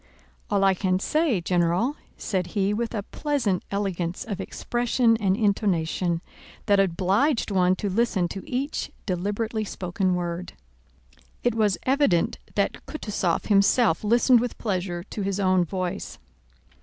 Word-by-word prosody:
"All 200 -1 +2
I 195 -1 +5
can 185 0 0
say, 280 - +1
General," 175 - +1 0.2
said 185 -4 -2
he 200 +1 +2
with 230 +2 -2
a 205 - -2
pleasant 235 - -1
elegance 185 -3 -2
of 200 -4 -4
expression 240 +2 +1
and 195 -2 +1
intonation 180 -5 0 0.4
that 205 -2 +4
obliged 195 - +2
one 185 -1 +3
to 205 - -3
listen 200 -2 +1
to 195 - -6
each 270 +4 -2 0.2
deliberately 205 +4 -2
spoken 185 -1 -1
word. 175 0 -4 0.9
It 245 - +2
was 215 -4 +2
evident 265 - +2 0.2
that - - 0
Kutúzov 200 - -2
himself 200 -1 +3
listened 240 +3 +5
with 245 0 -3
pleasure 180 -4 -2
to 210 - -6
his 195 0 -1
own 185 -2 +3
voice. 185 0 -4
200 Hz, 135 wpm, -25 LUFS, 180-225 Hz, 0.9 s, I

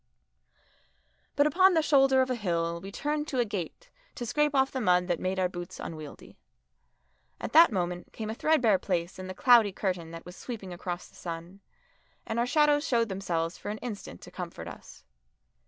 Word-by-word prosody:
But 285 - +4
upon 370 +5 +5
the 320 - +3
shoulder 270 -3 +5
of 260 - -3
a - - +1
hill 170 -5 -1
we 195 +2 -8
turned 295 +6 -2
to 270 - -3
a 245 - +3
gate 205 - -6 0.2
to 240 - -5
scrape 295 +4 +1
off 265 0 +3
the 260 - -3
mud 180 -3 +3
that 175 -2 0
made 185 +1 -2
our 185 -1 +2
boots 175 -1 -8
unwieldy. 155 -3 -9 1.0
At - - -5
that 330 -2 +8
moment 180 -2 -3
came 220 - -6
a 220 - -3
threadbare 240 -7 +3
place 175 -1 -2
in 185 - -6
the 185 - -6
cloudy 235 -5 +6
curtain 185 -4 -3
that 165 0 -9
was 180 +1 -10
sweeping 205 -7 -7
across 175 0 -5
the - - -24
sun, 170 +3 -7 0.7
and 225 - -2
our 240 - +1
shadows 295 +1 +3
showed 230 -3 +2
themselves 175 -3 -2
for - - -6
an 210 - -3
instant 210 - -7
to - - -12
comfort - - -7
us. - - -11
205 Hz, 190 wpm, -29 LUFS, 180-265 Hz, 1.0 s, that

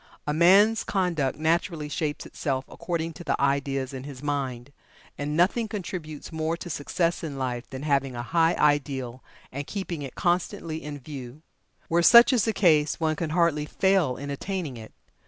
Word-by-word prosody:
A 150 - -1
man's 195 +7 +5
conduct 170 - 0
naturally 160 0 0
shapes 150 -1 -3
itself 135 -2 -3
according 165 -2 -4
to 175 - -10
the 155 - -1
ideas 140 -1 0
in 130 -1 -6
his 140 -1 -9
mind, 135 -3 -3 0.4
and 150 +1 -3
nothing 205 +6 +2
contributes 180 -7 -6
more 160 +1 -2
to 175 - -7
success 170 +4 -1
in 145 -4 -5
life 125 -2 -3
than 135 0 -7
having 140 -3 0
a 120 - -4
high 165 +5 +2
ideal 135 -4 0 0.3
and 140 +2 -5
keeping 185 -6 -4
it 135 -3 -7
constantly 170 -2 -1
in 150 -1 -6
view. 135 +1 -9 0.4
Where 170 +1 +2
such 235 +8 +8
is 235 -5 +3
the 225 - +2
case 155 -8 +3
one 160 -1 +1
can 160 +1 -3
hardly 155 -2 +1
fail 190 -10 +2
in 140 +1 -5
attaining 165 -1 -4
it. 110 -2 -10
150 Hz, 175 wpm, -26 LUFS, 140-170 Hz, 0.4 s, such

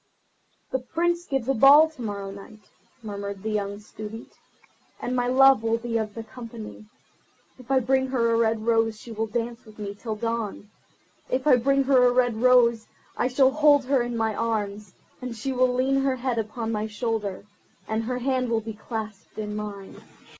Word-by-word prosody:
"The 260 - 0
Prince 340 +6 -1
gives 270 -4 -2
a 270 - +3
ball 280 +6 +8
to 310 - -12
morrow 200 -3 -4
night," 200 +1 -13 0.3
murmured 200 -2 -6
the 220 - -2
young 205 -1 -2
Student, 215 +2 -9 0.7
"and 250 +1 -3
my 245 -1 +1
love 265 -1 +6
will 225 0 +1
be 230 -1 -2
of 215 -2 -4
the 225 - -5
company. 225 -2 -10 0.7
If 255 - -15
I 265 -1 +3
bring 265 +2 +1
her 235 -3 +1
a - - +3
red 225 -1 +1
rose 225 -2 +2
she 235 - -11
will 225 0 -2
dance 230 +2 -3
with 215 -2 -16
me 205 -2 -5
till 215 +2 -5
dawn. 225 -2 -4 0.6
If 255 +2 -1
I 290 -4 +7
bring 275 +3 +2
her 260 -2 +4
a - - +4
red 245 -2 +2
rose, 240 -3 +4 0.3
I - - +1
shall 265 +1 +4
hold 290 -1 +4
her 270 -1 +2
in 240 0 -3
my 220 -1 0
arms, 210 -3 -3 0.3
and 250 -2 -5
she 250 +5 -3
will 255 -1 +2
lean 265 +2 +1
her 270 -1 +1
head 250 -2 -2
upon 225 +1 -3
my 215 0 -2
shoulder, 210 -3 -3 0.4
and 220 +1 -1
her 250 +1 -2
hand 255 -1 0
will 225 -1 +1
be 220 0 -6
clasped 215 -1 -7
in 210 -1 -4
mine. 205 -2 -7
230 Hz, 190 wpm, -25 LUFS, 215-255 Hz, 0.7 s, ball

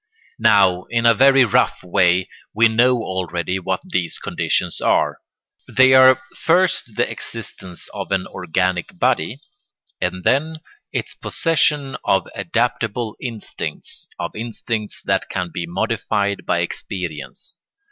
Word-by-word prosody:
Now, 95 -5 +4
in 115 0 0
a 115 - +7
very 135 +3 +6
rough 110 - +1
way, 90 0 +2 0.3
we 115 +2 +6
know 120 +3 +3
already 90 -1 -2
what 95 0 -2
these 90 -2 -2
conditions - - -1
are. - - +2 0.5
They 130 0 +5
are 130 0 +7 0.2
first 165 - +2
the 120 +1 +2
existence 95 -6 -7
of - - -6
an 95 -1 +1
organic 90 0 -2
body - - 0 0.6
and 90 0 -2
then 155 - +2 0.4
its - - -3
possession 150 -4 0
of 95 - +1
adaptable 120 -5 -1
instincts, 115 -4 -5
of - - -5
instincts 110 -1 -4
that - - 0
can 90 -2 -3
be 85 -1 -4
modified 100 +3 -1
by - - +2
experience. 85 -7 -6
105 Hz, 125 wpm, -20 LUFS, 90-125 Hz, 0.6 s, a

